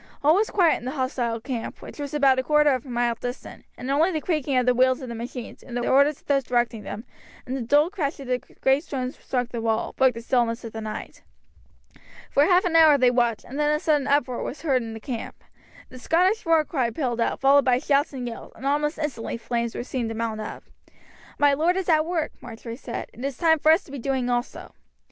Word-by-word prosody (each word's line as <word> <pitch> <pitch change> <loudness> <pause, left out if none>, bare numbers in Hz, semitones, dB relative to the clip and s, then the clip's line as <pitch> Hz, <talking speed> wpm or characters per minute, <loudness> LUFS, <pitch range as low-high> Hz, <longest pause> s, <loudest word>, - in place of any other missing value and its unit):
All 300 +2 +6
was 420 +5 +2
quiet 350 -5 +3
in - - -11
the 260 - -3
hostile 255 -4 -2
camp, 235 -1 -5
which - - -11
was 285 -2 -4
about 275 -3 +3
a - - 0
quarter 300 +1 +4
of 255 0 -2
a - - -9
mile 240 -1 +1
distant, 245 +3 -7
and 255 +2 -4
only 310 +6 +3
the 320 -4 -1
creaking 300 -5 -1
of 250 - +2
the 250 - +4
wheels 255 +1 +3
of 255 - -7
the - - -5
machines, 235 +1 -7
the 245 -1 -3
orders 280 +2 +3
of - - -38
those 275 -1 +2
directing 240 -2 0
them, 210 +1 -7 0.4
and 255 - -4
the 270 - -3
dull 290 +8 +3
crash 315 -8 -3
as 275 - -8
the 250 0 0
great 270 +3 0
stones 260 -5 -4
struck 245 -2 -2
the 235 -2 -4
wall, 225 -1 -1
broke 260 -3 +3
the 230 - -6
stillness 235 -1 0
of 230 - -8
the 220 - -5
night. 215 0 -7 1.1
For 285 - +4
half 360 +2 +4
an 340 -2 0
hour 315 -3 +7
they 255 -2 +4
watched, 240 -3 0
and 275 +3 -7
then 295 0 +2
a 300 - +1
sudden 295 -3 +1
uproar 280 -3 +1
was 295 - -6
heard 270 -5 +2
in 225 -1 -6
the - - -7
camp. 230 +1 -6 0.5
The 255 - -11
Scottish 365 - +1
war 325 -2 +4
cry 260 -7 -1
pealed 240 -1 -2
out, - - 0
followed 275 +1 +5
by 250 -2 +4
shouts 285 +2 +1
and 255 -3 -5
yells, 230 - -8
and - - -10
almost 295 +2 0
instantly 275 -7 -3
flames 235 0 -3
were - - -3
seen 250 -2 -3
to 225 - -5
mount 220 -1 -3
up. 215 - -7 0.7
"My 290 -1 +4
lord 330 +6 +2
is 380 -2 -2
at 310 -1 +3
work," 335 -3 -1
Marjory 230 +1 -8
said, 240 -2 -7
"it 240 - -10
is 275 -2 -3
time 320 -2 +3
for 310 - +5
us 330 +5 +4
to - - -15
be 280 - -6
doing 255 -1 -1
also." 240 +1 -3
265 Hz, 240 wpm, -24 LUFS, 240-295 Hz, 1.1 s, hour